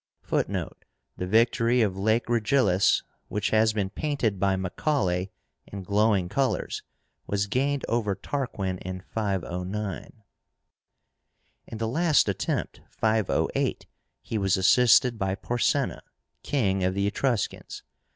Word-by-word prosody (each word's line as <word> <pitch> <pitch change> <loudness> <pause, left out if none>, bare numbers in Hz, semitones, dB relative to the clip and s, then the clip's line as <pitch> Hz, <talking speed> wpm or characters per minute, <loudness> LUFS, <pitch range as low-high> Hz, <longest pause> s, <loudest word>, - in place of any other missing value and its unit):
(Footnote: - - -2 0.3
The 90 - -3
victory 115 +3 +3
of 100 -3 0
Lake 110 +4 +1
Regillus, 115 -5 +3 0.2
which 105 - -2
has 110 0 +4
been 100 -3 -2
painted 125 -8 -1
by 100 0 +2
Macaulay 95 - -1 0.4
in 100 -1 -7
glowing 100 -1 +2
colors, 135 +7 -1 0.5
was 100 0 0
gained 135 +6 0
over 110 -4 0
Tarquin 100 -11 -3
in 95 0 -6
509.) 100 +1 -3 1.4
In 110 - -7
the 115 0 -2
last 155 +3 +3
attempt 95 -5 -2
(508), 110 -2 0 0.4
he 110 - -3
was 95 -2 +2
assisted 120 +4 +5
by 95 0 0
PORSENA, 120 +3 0 0.4
king 95 -9 0
of 95 +1 0
the 100 0 0
Etruscans. 120 +2 -2
105 Hz, 115 wpm, -26 LUFS, 95-120 Hz, 1.4 s, assisted